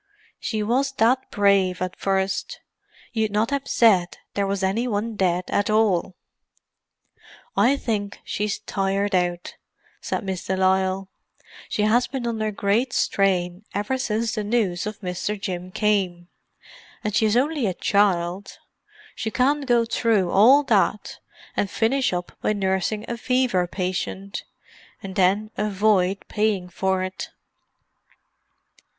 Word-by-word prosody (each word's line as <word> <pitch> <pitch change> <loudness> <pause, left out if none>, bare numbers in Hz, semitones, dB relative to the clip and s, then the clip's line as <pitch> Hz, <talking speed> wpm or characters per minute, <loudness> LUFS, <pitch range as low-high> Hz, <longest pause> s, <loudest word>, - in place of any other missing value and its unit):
She 215 -2 -2
was 265 +5 +1
that 255 +1 +2
brave 200 -3 +2
at 185 0 -3
first, 195 0 -1 0.5
you'd 220 -2 +1
not 210 +4 0
have 280 -1 -2
said 190 -7 +3 0.2
there 200 -1 0
was 195 0 -2
any 215 +6 0
one 220 0 -2
dead 180 -2 +1
at 205 - +1
all." 205 -4 +2 1.4
"I 270 +4 +4
think 205 -6 -3
she's 210 0 -2
tired 195 +1 -1
out," 175 -1 0 0.5
said - - -3
Miss 190 -2 -4
de 190 - -2
Lisle. 190 0 +1 0.6
"She 210 - 0
has 240 +4 +3
been 265 -3 -4
under 220 -2 -1
great 215 +5 0
strain 185 -1 +1
ever 210 +6 -1
since 225 -2 -1
the 215 - -2
news 205 -4 0
of 210 -1 -6
Mr. 190 +3 -3
Jim 185 -2 -4
came. 185 -5 0 0.7
And 210 -1 -2
she 220 - +3
is 215 +2 +2
only 280 -2 +1
a 185 - -2
child. 190 -2 +1 0.6
She 220 - -3
can't 275 +4 +1
go 240 -2 +3
through 220 -6 +1
all 255 +9 +6
that - - +1 0.4
and 200 - 0
finish 240 +6 +1
up 180 -1 -3
by - - +1
nursing 195 +2 -1
a 235 - -3
fever 245 -7 +1
patient—and 190 +1 -6
then 200 +4 +2
avoid 200 -2 +1
paying 210 -4 0
for 190 +1 0
it." 185 0 -5
205 Hz, 135 wpm, -23 LUFS, 190-225 Hz, 1.4 s, all